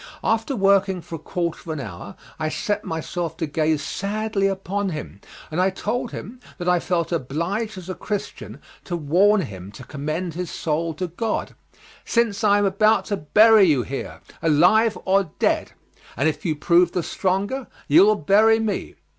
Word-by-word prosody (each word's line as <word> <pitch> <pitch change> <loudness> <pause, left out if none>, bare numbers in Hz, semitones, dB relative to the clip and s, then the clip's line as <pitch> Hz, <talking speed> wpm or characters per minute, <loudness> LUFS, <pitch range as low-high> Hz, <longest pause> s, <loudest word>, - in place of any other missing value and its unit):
After 225 +5 0
working 195 -2 +3
for - - -12
a - - -15
quarter 170 +1 -3
of - - -17
an 155 -2 -3
hour 100 -5 -8 0.2
I 155 - -1
set 205 +6 -2
myself 160 0 -4
to 160 - -1
gaze 155 0 0
sadly 205 0 -1
upon 195 +1 -2
him, 150 - -7 0.3
and 165 +4 0
I 190 - +3
told 225 +5 -3
him 245 +3 -8 0.2
that 175 - -5
I 180 -1 +4
felt 170 0 -1
obliged 170 - -2
as 185 -2 -9
a 185 - -3
Christian 205 +2 -5 0.3
to 175 - -3
warn 190 +7 +3
him 100 - -8
to 130 - -10
commend 155 +6 -4
his 180 +1 -4
soul 160 +1 -2
to 180 - -3
God, 215 +7 -3 0.5
"since 230 -3 0
I 205 -1 +5
am 205 - +2
about 215 +3 +3
to 205 - -1
bury 210 +7 +6
you 145 -8 +3
here, 135 +3 -6 0.2
alive 180 +9 +4
or 195 +1 +3
dead; - - 0 0.4
and 140 +5 +2
if 150 -1 -2
you 160 -3 0
prove 170 +3 +3
the 180 - -1
stronger, 200 +10 -1 0.2
you 160 +6 +7
will 215 +1 +5
bury 210 +6 +4
me. 220 -2 -3
180 Hz, 180 wpm, -23 LUFS, 160-205 Hz, 0.5 s, you